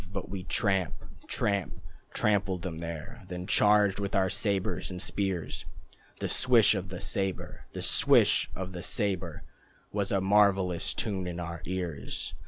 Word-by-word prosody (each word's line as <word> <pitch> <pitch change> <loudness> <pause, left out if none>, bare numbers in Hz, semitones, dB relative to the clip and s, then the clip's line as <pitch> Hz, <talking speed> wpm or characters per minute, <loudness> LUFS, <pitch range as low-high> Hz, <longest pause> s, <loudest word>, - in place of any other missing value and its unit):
But 95 -1 -5
we 95 -1 -4
tramp 95 -6 +1 0.3
Tramp 100 -2 -1 0.3
Trampled 100 -4 +1
them 80 -4 -4
there, 85 +8 -6
Then 90 -1 -5
charged 105 0 +4
with 100 0 -2
our 95 -1 +3
sabres 100 -3 -1
and 90 -1 -6
spears. 95 -3 -2 0.6
The - - -1
swish 120 -5 +5
of 95 -2 -3
the 90 -1 -6
sabre, 95 -1 -3
The - - -4
swish - - +4
of 95 0 -5
the 90 -1 -6
sabre, 95 +1 -2 0.5
Was 100 -1 -1
a 100 - +3
marvellous 95 -3 +3
tune 95 -4 -1
in 90 -1 -4
our 85 -1 -5
ears. 90 -5 -4
95 Hz, 150 wpm, -29 LUFS, 90-100 Hz, 0.6 s, swish